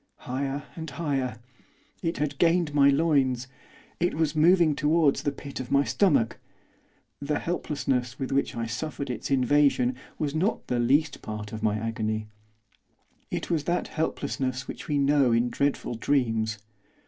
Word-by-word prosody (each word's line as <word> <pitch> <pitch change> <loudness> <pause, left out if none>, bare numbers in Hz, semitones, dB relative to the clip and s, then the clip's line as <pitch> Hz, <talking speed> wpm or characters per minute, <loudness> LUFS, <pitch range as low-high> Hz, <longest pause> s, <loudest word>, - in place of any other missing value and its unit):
Higher 135 +3 -3
and 160 -1 -6
higher! 135 -5 -2 0.6
It 165 -2 -1
had 145 -2 -2
gained 170 -2 +3
my 140 -1 +6
loins. 140 -4 +2 0.5
It 175 +1 +1
was 155 -1 0
moving 165 0 +5
towards 155 -1 +3
the 145 - 0
pit 140 0 -8
of 130 - -5
my 140 0 +4
stomach. 145 - +2 0.8
The 145 +1 0
helplessness 135 -7 -2
with 135 - -4
which 140 +1 0
I 115 -1 -2
suffered 135 +3 -4
its 120 - -5
invasion 135 -1 +3 0.2
was 145 -2 -2
not 180 +8 0
the 125 - -1
least 140 +5 +2
part 105 -1 -6
of 110 - -5
my 105 -1 +1
agony, 110 -1 -2 1.0
it - - -4
was 155 -3 0
that 175 +1 -1
helplessness 135 -5 -2
which - - -7
we 150 - 0
know 140 -3 +3
in 120 +1 +2
dreadful 140 0 0
dreams. 115 -3 0
140 Hz, 150 wpm, -27 LUFS, 125-150 Hz, 1.0 s, my